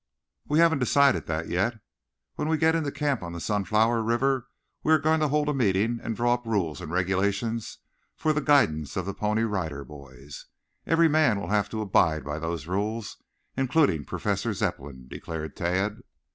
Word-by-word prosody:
"We 150 - +1
haven't 165 -3 +4
decided 140 +2 +3
that 80 +1 -2
yet. 105 +6 -1 0.5
When - - -3
we 160 - +2
get 160 +1 +3
into 160 -4 -1
camp 145 -4 -1
on 85 -1 -6
the 85 - -5
Sunflower 110 +4 +1
River 125 +3 0 0.3
we 155 - +1
are - - +7
going 155 +2 +2
to 155 - +2
hold 150 +1 +1
a 150 - +1
meeting 115 -1 +1
and 115 - -3
draw 120 +2 +2
up 120 0 -3
rules 90 -10 -1
and - - -7
regulations 100 +5 -1 0.4
for 155 - +1
the 150 - 0
guidance 80 - +2
of 95 - -2
the 100 - -3
Pony 105 +2 0
Rider 85 -10 -3
Boys. 70 0 -12 0.4
Every 165 0 +4
man 155 -9 +3
will 100 - -6
have 105 -1 +1
to 110 0 -4
abide 80 -6 +2
by 75 +2 -4
those 80 -2 -4
rules, 105 +4 -3 0.4
including 130 - +2
Professor - - -2
Zepplin," 65 -2 -4
declared 80 +1 -6
Tad. 95 +3 -1
105 Hz, 180 wpm, -26 LUFS, 85-135 Hz, 0.5 s, are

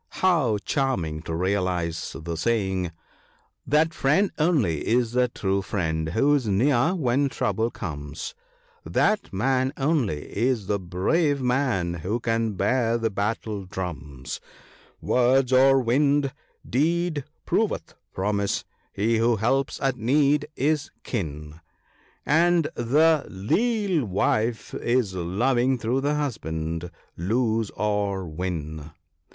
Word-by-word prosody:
How 150 - +3
charming 90 - -1
to 80 0 -4
realize 90 -2 -1
the 85 +1 -4
saying! 95 -3 0 0.2
— - - -34
" - - -41
That 155 +3 +3
friend 170 +10 +2
only 140 - +2
is 120 0 +2
the 125 0 +2
true 100 -4 -1
friend 80 -5 -2
who 135 - +3
is 135 -6 +1
near 125 - +2
when 140 -3 +1
trouble 110 -1 0
comes; 75 -7 -6 0.5
That 215 0 +1
man 130 +6 +1
only 135 - 0
is 115 -1 +1
the 100 +1 0
brave 140 - +1
man 125 -9 0
who 90 +8 -2
can 115 -2 0
bear 115 +3 +1
the 115 -1 -1
battle 105 0 -2
drums; 75 -8 -6 0.6
Words 130 +1 +3
are 135 +1 +6
wind; 140 +3 +2 0.3
deed 160 +2 +1 0.2
proveth - - 0 0.2
promise: 100 +1 -1 0.3
he 110 +3 +1
who 115 +1 +3
helps 130 +6 0
at 135 -2 +1
need 145 +5 +2
is 150 +2 0
kin; 75 - -5 0.6
And 165 +1 +3
the 150 +6 +3
leal 190 - 0
wife 110 +4 0
is 120 -5 0
loving 120 +9 +1
though 120 +3 0
the 145 +2 0
husband 85 - -3 0.3
lose 110 +3 0
or 100 -2 -1
win." 80 -2 -5
115 Hz, 120 wpm, -25 LUFS, 95-135 Hz, 0.6 s, are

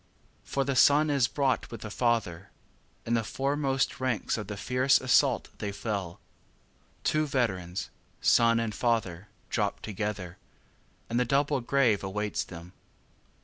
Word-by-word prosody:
5. - - -17
For 140 - +1
the 135 0 -1
son 145 +4 +5
is 135 -4 +3
brought 135 0 0
with 115 -2 -8
the 110 - -7
father; 105 -7 -1 0.6
In 115 - -1
the 115 -1 +2
foremost 135 +2 -1
ranks 130 -6 -1
of 105 -3 -5
the 105 -1 -6
fierce 130 +5 +3
assault 130 0 +2
they 105 -1 -3
fell; 100 -4 -4 0.8
Two 155 0 +1
veterans, 95 -10 -2 0.3
son 115 0 +4
and 115 -2 -2
father, 105 -6 -1 0.2
dropped - - -1
together, 100 -4 -4 0.7
And 120 +1 0
the - - +3
double 140 +2 +1
grave 120 -5 +2
awaits 105 +2 -2
them. 85 +1 -11
115 Hz, 145 wpm, -28 LUFS, 100-135 Hz, 0.8 s, son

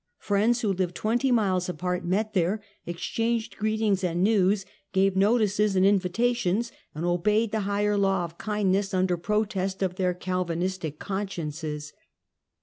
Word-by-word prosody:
Friends 220 +4 +1
wlio 195 -4 0
lived 180 -2 0
twenty 240 +4 +1
miles 190 -6 +2
apart, 180 +1 -2
met 205 +5 0
here, 190 +2 +1 0.3
exchanged 225 +6 -2
greet 215 0 -1
ings 200 -3 +2
and 175 0 0
news, 200 -1 +3 0.3
gave 190 0 +3
notices 210 0 +3
and 185 0 +4
invitations, 205 +3 +1 0.2
and 160 +3 -3
obey 195 +5 +2
ed 225 - -4
the 220 - 0
higher 205 +1 +1
law 195 -2 +2
of 170 0 -8
kindness 200 -2 0
under 185 -1 +2
protest 195 0 -1
of 185 -2 0
theii 180 -1 0
Calvinistic 180 -3 -2
consciences. 155 -6 -4
195 Hz, 145 wpm, -26 LUFS, 180-210 Hz, 0.3 s, and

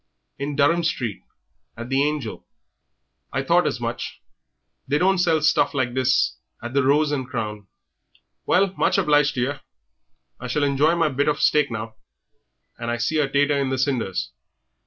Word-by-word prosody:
"In 140 +1 -3
Durham 165 +4 +3
street, 125 - -2 0.6
at 120 +1 -7
the 135 +1 +2
'Angel.'" 145 -6 -2 0.9
"I - - -1
thought - - +3
as - - -2
much; - - -5 0.7
they 145 +2 +1
don't 190 +3 +2
sell 165 -3 +2
stuff 145 -2 +2
like 125 -3 0
this 130 0 +1 0.2
at 120 +2 -7
the 140 - +3
'Rose 145 +3 +2
and 135 -4 -2
Crown.' 105 -5 -5 0.8
Well, 195 0 +3
much - - +2
obliged 145 -1 +3
to 125 - -1
yer. 140 +3 -2 0.8
I 130 - -6
shall 145 +4 0
enjoy 145 +4 +2
my 165 -2 +2
bit 145 +1 -1
of 150 -1 +1
steak 150 -1 +3
now; 110 -1 -6 0.8
and 115 0 -4
I 120 - -1
see 135 +7 0
a 140 -2 +1
tater 145 +1 +2
in 135 -1 0
the 130 - -1
cinders. 120 - -1
140 Hz, 170 wpm, -23 LUFS, 125-150 Hz, 0.9 s, Durham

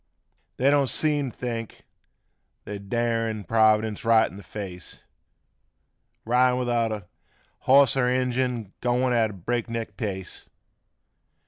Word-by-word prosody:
They 135 +2 +3
don't 140 -2 +3
seem 145 0 +1
t' - - -16
think 115 -3 -5 0.8
they're 105 0 -6
darin' 115 +1 -1
Provi 110 +2 +4
dence 110 -2 -5
right 115 -1 +4
in 95 - -11
th' - - -12
face, 90 -3 -8 1.2
Ridin' 125 +2 +3
without 115 -5 -1 0.5
hoss 135 -1 +5
er 130 -2 +2
engine 125 0 +1
'n' 105 -4 -10
goin' 125 +1 +1
at 115 -2 +2
a - - -8
break 120 +6 -3
neck 115 -1 -5
pace. 95 -5 -5
115 Hz, 130 wpm, -25 LUFS, 110-125 Hz, 1.2 s, hoss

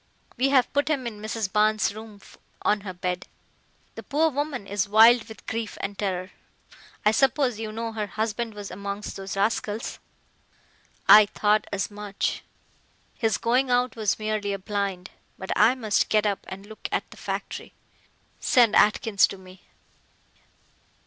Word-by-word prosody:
We 265 +2 +2
have 260 -3 +3
put 285 0 +1
him 285 -5 0
in 215 -3 -6
Mrs. 215 -2 -3
Barnes' 215 0 +2
room 215 -1 -11 0.4
on 210 -1 +2
her 195 -2 -6
bed. 180 0 -3 0.7
The - - -8
poor 315 +3 +1
woman 285 -5 -3
is 200 0 -2
wild 225 +2 +7
with 220 - -12
grief 225 -1 -4
and 200 +1 -4
terror. 185 -2 -3 0.7
I 210 - +6
suppose 255 -1 +2
you 220 -1 -4
know 225 +1 -4
her 215 -2 -3
husband 220 +2 -3
was 205 -1 -7
amongst 200 +1 -5
those 195 0 -6
rascals." 215 +1 -1 1.1
"I 210 -1 +9
thought 210 +1 +1
as 195 0 -2
much. 205 -1 -3 0.7
His 225 -3 0
going 255 +3 +1
out 245 -1 +1
was 215 -3 0
merely 215 -2 -2
a - - -2
blind. 195 -2 -3 0.3
But 190 - -6
I 225 +4 +5
must 220 -5 0
get 215 -1 +2
up 200 -2 -1
and 195 +1 -8
look 215 +1 -8
at - - -2
the - - -13
factory. - - -5 0.6
Send 240 -6 +4
Atkins 210 -1 +4
to 195 - -8
me." 185 0 -16
215 Hz, 155 wpm, -25 LUFS, 200-230 Hz, 1.1 s, I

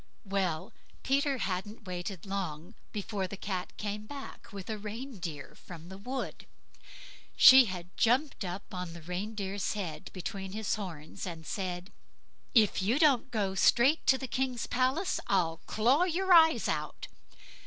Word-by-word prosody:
'" - - -39
Well! 190 -3 -1 0.3
Peter 275 0 +2
hadn't 205 +1 -4
waited 180 0 -5
long 185 -2 -4 0.2
before 205 -2 -3
back 190 -1 -5
came 210 0 -4
the 290 - -8
cat - - -11
with 200 -2 -8
a 220 -1 -4
reindeer 205 - -6
from 170 -1 -11
the 190 - -8
wood; 255 +6 -5 0.9
she 260 0 +10
had 180 -3 -7
jumped 255 +2 +2
up 185 +3 -6
on 180 -2 -4
the 170 -1 -10
reindeer's 195 +2 -3
head, 170 -7 -5
between 190 +1 -5
his 215 -1 -1
horns, 175 -5 -6
and 165 -2 -7
said, 180 0 -4 0.6
"If 215 -4 +5
you 220 +8 +2
don't 280 -5 +4
go 205 -5 -1
straight 240 - +4
to 265 - +6
the 265 - -5
king's 255 -1 -1
palace 260 +9 +1
I'll 170 -4 +2
claw 255 +10 +3
your 370 +1 +2
eyes 320 -1 +6
out." - - -3
200 Hz, 150 wpm, -31 LUFS, 180-250 Hz, 0.9 s, she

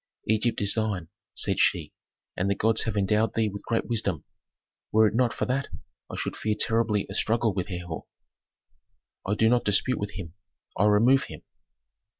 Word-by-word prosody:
"Egypt 110 +2 +1
is 100 0 +3
thine," 105 -7 -2 0.3
said - - 0
she, - - +2 0.4
"and 95 +2 -1
the 100 - +1
gods 110 +2 +2
have 110 -2 -2
endowed 105 +3 +1
thee 110 -1 +1
with 100 0 -7
great 115 -1 0
wisdom. 100 -9 -1 0.7
Were 110 +1 +5
it 105 - +1
not 120 0 +2
for - - -2
that, 135 +2 -1 0.4
I - - -6
should - - -3
fear 110 -1 -1
terribly 110 -3 +2
a - - -7
struggle 115 -1 +1
with 90 -1 -3
Herhor." 90 -4 -6 1.2
"I 105 - +1
do 110 - +3
not 120 +1 +3
dispute 105 +4 +2
with 105 0 -4
him; 85 -4 -7 0.4
I 105 - +2
remove 120 +6 +4
him." 75 - -10
110 Hz, 175 wpm, -26 LUFS, 100-115 Hz, 1.2 s, Were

